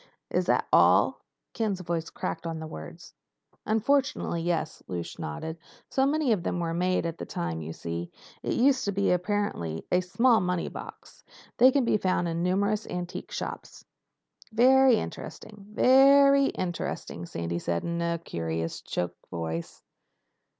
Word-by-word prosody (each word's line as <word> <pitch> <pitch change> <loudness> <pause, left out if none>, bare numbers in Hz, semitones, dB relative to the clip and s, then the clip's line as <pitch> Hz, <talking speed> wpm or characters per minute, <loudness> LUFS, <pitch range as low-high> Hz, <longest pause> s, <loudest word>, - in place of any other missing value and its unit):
"Is - - 0
that - - +2
all?" - - +5 0.3
Ken's 215 -5 -1
voice 165 -2 -3
cracked 90 - -4
on 165 -1 -3
the 160 - -6
words. 80 - -10 0.5
"Unfortunately 225 -5 +1
yes." 165 -2 -2
Lausch 85 -2 -5
nodded. 160 - -5 0.3
"So 270 0 +3
many 295 -3 +1
of 205 -5 +2
them 175 - -2
were 165 -1 -1
made 180 +1 +1
at 165 0 -4
the - - -4
time, 85 -1 -3
you 80 +1 -6
see, 85 +1 -5 0.3
to - - -4
be - - +1
used—apparently—as 200 - 0
small 235 +3 +4
money 180 -1 -1
boxes. - - -11 0.3
They 255 +2 +7
can 270 -2 +2
be 220 - +3
found 185 -3 0
in 165 0 -2
numerous 200 +4 0
antique 180 0 -5
shops." - - -6 0.7
"Very 260 +2 +6
interesting. 210 -1 -7
Ve 215 - 0 0.4
ry 275 0 +5
interesting," 170 - -4
Sandy 85 0 -3
said 85 -1 -2
in 170 0 -2
a 170 0 0
curious 80 - -4
choked 90 0 -4
voice. 85 -1 -5
175 Hz, 145 wpm, -27 LUFS, -, 0.7 s, They